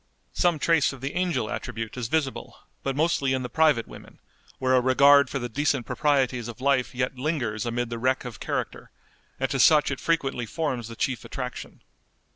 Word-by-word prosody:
Some 175 -3 +2
trace 160 -2 +2
of 135 - -11
the 135 +1 -4
angel 175 -11 0
attribute 110 +1 -5
is 125 -2 -3
visible, 140 0 -2 0.2
but 135 -1 -2
mostly 140 -3 +1
in 130 -1 -1
the 125 - -5
private 150 -7 +2
women, - - -13 0.4
where 130 0 +1
a 130 - +5
regard 140 +2 +5
for - - -3
the 120 -2 -3
decent 135 0 0
proprieties 135 -5 0
of 120 +1 -8
life 130 -2 +1
yet 125 0 -2
lingers 125 -7 -2
amid 120 0 -2
the 115 - -4
wreck 130 +2 0
of 120 -3 -7
character, - - -4 0.5
and 135 - +1
to 135 - -1
such 150 +2 +5
it 140 - -3
frequently 135 -8 -1
forms 130 -5 -3
the 115 - -9
chief 130 +1 -2
attraction. 125 -2 -7
130 Hz, 190 wpm, -25 LUFS, 120-145 Hz, 0.5 s, a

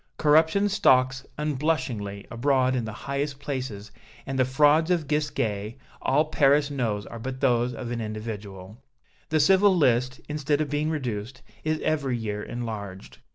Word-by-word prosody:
Corruption 160 +6 +4
stalks 130 -9 +3
unblushingly 130 -9 -2
abroad 130 +1 +2
in 120 -3 -1
the 110 - -5
highest 140 +1 -2
places, 130 -8 -5 0.3
and 135 -1 -3
the 130 - +4
frauds 150 +5 +4
of 170 -5 +1
Gisquet 115 -8 -1 0.2
all 150 +4 +2
Paris 145 -1 +3
knows 110 -7 -2
are 115 - -8
but 130 +3 -5
those 125 -2 +2
of 120 0 -6
an 120 -1 -3
individual. 105 -1 -7 0.5
The 155 - +2
civil 190 +4 +5
list, 125 -3 +2
instead 150 -1 0
of 150 -2 -2
being 150 +1 0
reduced, 125 -5 -4 0.2
is 155 0 0
every 140 -5 0
year 105 -2 -4
enlarged. 105 -5 -6
130 Hz, 150 wpm, -26 LUFS, 115-150 Hz, 0.5 s, civil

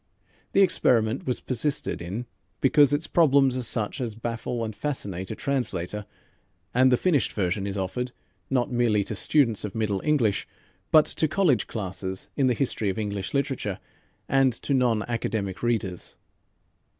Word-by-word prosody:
The 195 - +6
experiment 120 - +2
was 125 - 0
persisted 140 - -2
in 100 +8 -5 0.3
because 145 +1 +5
its 145 +3 +1
problems 140 -5 +4
are 130 - -1
such 115 +2 0
as 115 -4 -3
baffle 115 +1 -3
and 110 -1 -6
fascinate 100 -11 -3
a - - -4
translator, 105 -7 -2 0.7
and 130 +1 +5
the 125 - +5
finished 155 -6 +1
version 95 0 -1
is 100 0 -3
offered 125 +7 -3 0.4
not 125 -2 0
merely 120 -4 +2
to 110 - -5
students 115 -2 +2
of 105 -2 -5
Middle 105 -3 -1
English 130 -10 +1 0.4
but 155 -1 +7
to 160 - +1
college 155 - +2
classes 95 -2 -5
in 135 -2 +2
the 125 - +2
history 110 -5 0
of 95 - -3
English 100 +1 -3
literature, 135 -8 -1 0.5
and 135 -1 +3
to 140 - -2
non 120 -5 +2
academic 110 -5 -3
readers. 110 -7 -2
120 Hz, 155 wpm, -26 LUFS, 105-135 Hz, 0.7 s, but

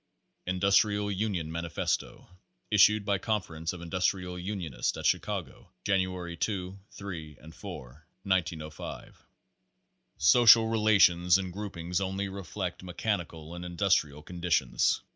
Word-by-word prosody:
INDUSTRIAL 100 +2 +2
UNION 95 -5 -2
MANIFESTO 85 0 -3 0.4
Issued 105 0 +5
by 100 -2 +1
Conference 90 -7 -2
of 90 - -9
Industrial 90 +1 -1
Unionists 90 -9 -3
at - - -6
Chi - - +4
cago, - - -6 0.2
January 90 -3 -1
2, 95 +2 -3
3 80 -7 -8
and 80 +1 -13
4, 75 +1 -10 0.2
1905. 80 -5 -3 0.9
Social 115 - +7
relations 95 -6 +4
and 95 -2 -5
groupings 90 -3 -3
only 95 +1 -2
reflect 95 -1 -5
mechani 90 0 -2
cal 80 0 -11
and 85 0 -7
industrial 85 -5 0
conditions. 85 -8 +1
90 Hz, 115 wpm, -29 LUFS, 85-100 Hz, 0.9 s, Social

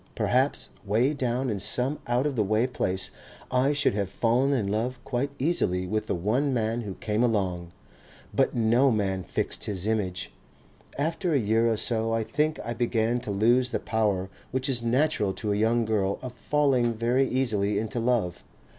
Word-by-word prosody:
Perhaps - - +1
way 115 +8 +2
down 130 -2 -1
in 100 - -2
some 125 +8 0
out 120 +3 +1
of 145 -2 -1
the 110 - +1
way 110 +4 +2
place 95 -7 -2 0.4
I 130 +2 +3
should 145 -6 +2
have 100 -2 -1
fallen 120 +6 +1
in 125 -7 +1
love 115 +5 -1
quite 130 +2 -1
easily 110 - 0
with 110 +3 -2
the - - 0
one 115 +11 0
man 115 +1 0
who 100 -4 -6
came 105 +1 -1
along. 95 -7 0 0.6
But - - +2
no 120 +4 +4
man 100 -5 0
fixed - - -3
his 100 -2 -4
image. 100 -4 -2 0.7
After 165 +4 -1
a - - +4
year 115 +1 +2
or 110 - +1
so 115 0 +1
I 115 0 +1
think 150 +6 0
I 120 - -2
began 120 0 0
to 120 - -8
lose 120 +5 +3
the - - -1
power 105 -5 0 0.2
which 130 +1 -1
is 130 -3 0
natural 120 -4 +1
to 105 0 -2
a - - 0
young 115 +2 +2
girl 100 -3 0
of 125 -2 -6
falling 130 -4 +1
very 120 +4 +2
easily 105 -6 0
into 110 +3 -2
love. 115 -7 0
115 Hz, 180 wpm, -27 LUFS, 105-130 Hz, 0.7 s, no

